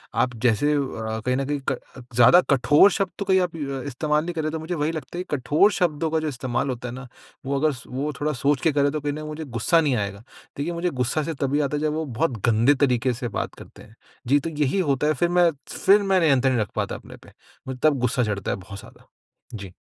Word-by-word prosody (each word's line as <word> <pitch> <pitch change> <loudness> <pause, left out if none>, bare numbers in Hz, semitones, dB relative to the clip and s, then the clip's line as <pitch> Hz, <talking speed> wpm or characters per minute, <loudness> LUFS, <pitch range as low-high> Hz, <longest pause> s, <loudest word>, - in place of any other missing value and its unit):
आप 125 -1 +1
जैसे 125 +6 +3
अ, - - +2 0.5
कहीं 125 0 +1
न 135 - -1
कहीं 145 +1 -2
क - - -2 0.4
ज़्यादा 125 +9 +7
कठोर 145 +8 +5
शब्द 195 -4 -1
तो 200 - -2
कहीं 190 -1 +4
आप 175 -2 -2
अ, 140 -4 -4
इस्तेमाल 150 +3 0
नहीं 175 - -4
कर 160 - -1
रहे 155 - -1
तो 160 - -4
मुझे 160 +3 -4
वही 150 0 0
लगता 165 +2 -7
है 180 - -2
कि 150 - -3
कठोर 150 +11 +3
शब्दों 165 -4 0
का 160 - +1
जो 155 - -3
इस्तेमाल 130 -1 -2
होता 125 -1 -4
है 120 - -7
ना 135 0 -9 0.4
वो 140 +1 -1
अगर 155 +2 +2
सो 125 - -13
वो 140 +4 -2
थोड़ा 150 +1 0
सोच 140 0 0
के 160 - +3
करें 145 0 +2
तो 155 0 -3
ना 155 +1 -6
मुझे 155 +1 -6
गुस्सा 135 +7 +2
नहीं 145 -5 +1
आएगा। 100 -1 -4 0.3
देखिए 155 +5 -2
मुझे 170 +1 -1
गुस्सा 130 +5 0
से 165 - -3
तभी 140 +1 +1
आता 150 - -4
है 145 - -4
जब 155 -1 0
वो 160 0 -2
बहुत 125 0 -1
गंदे 115 +6 +4
तरीक़े 125 -1 +2
से 120 +1 -4
बात 100 - -4
करते - - -14
हैं। 110 0 -17 0.3
जी, 140 +4 +4
तो 165 +4 -4
यही 150 +3 0
होता 140 0 +1
है 155 - +3
फिर 170 +4 0
मैं 175 -1 +4 0.2
फिर 205 +2 +4
मैं 195 -1 +2
नियंत्रण 135 -5 +3
नहीं 120 - +1
रख 105 - -3
पाता - - -2
अपने - - -11
पे, - - -18 0.4
मैं 130 - -5
तब 150 -4 +3
गुस्सा 125 0 +1
चढ़ता 100 -3 -2
है - - -2
बहुत 100 +1 -10
ज़्यादा। - - -16 0.5
जी। 100 -3 -8
145 Hz, 255 wpm, -23 LUFS, 125-160 Hz, 0.5 s, ज़्यादा